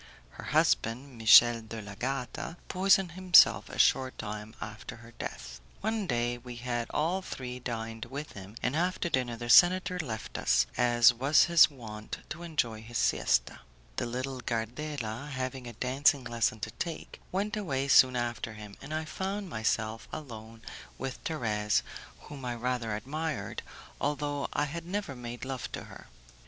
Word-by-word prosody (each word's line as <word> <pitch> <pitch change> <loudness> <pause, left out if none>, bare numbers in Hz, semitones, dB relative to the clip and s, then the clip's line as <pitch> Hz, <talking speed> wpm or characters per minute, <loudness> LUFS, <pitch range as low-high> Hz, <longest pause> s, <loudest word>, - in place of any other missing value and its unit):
Her - - -10
husband, 125 +4 +1
Michel 115 +2 +8
de 110 0 -7
l'Agata, 125 - -4
poisoned 190 -1 +3
himself 185 0 +6
a - - -8
short 130 -1 +3
time 105 0 -6
after - - -7
her 115 +1 -14
death. 60 - -7 0.2
One 220 -1 -1
day 120 -1 0
we 120 0 -9
had 120 -1 -3
all 170 +5 0
three 125 -8 -6
dined 115 -1 -5
with 140 +5 -6
him, 100 +1 -10
and 125 +3 0
after 175 +1 0
dinner 125 -5 -1
the 120 +1 -6
senator 180 +6 +6
left 115 -9 -5
us, 60 0 +3
as 120 0 +5
was 135 +6 +4
his 170 -2 +7
wont, 110 -6 -8
to 170 - -6
enjoy 120 -10 -2
his 115 +1 -5
siesta; - - +1 0.4
the - - -1
little 130 +2 -4
Gardela, 120 +2 -4
having 130 -2 -4
a 120 - -7
dancing 130 +3 +2
lesson 115 -2 0
to - - -4
take, 165 -2 -6
went 205 +3 -1
away 140 -10 -1
soon 130 -2 +6
after 120 -2 -2
him, 105 -2 -10
and 150 +3 -5
I 160 0 -2
found 195 +4 -4
myself 110 -1 -1
alone 115 -6 -9 0.3
with 135 0 -5
Thérèse, 105 -9 0 0.4
whom 145 -3 -10
I 120 -1 -2
rather 120 -2 -2
admired, 150 +8 -4 0.4
although 145 0 -1
I 145 - +1
had 165 +3 -6
never 195 -7 -3
made 120 0 -7
love 130 -2 -5
to - - -5
her. - - -13
125 Hz, 160 wpm, -30 LUFS, 115-150 Hz, 0.4 s, Michel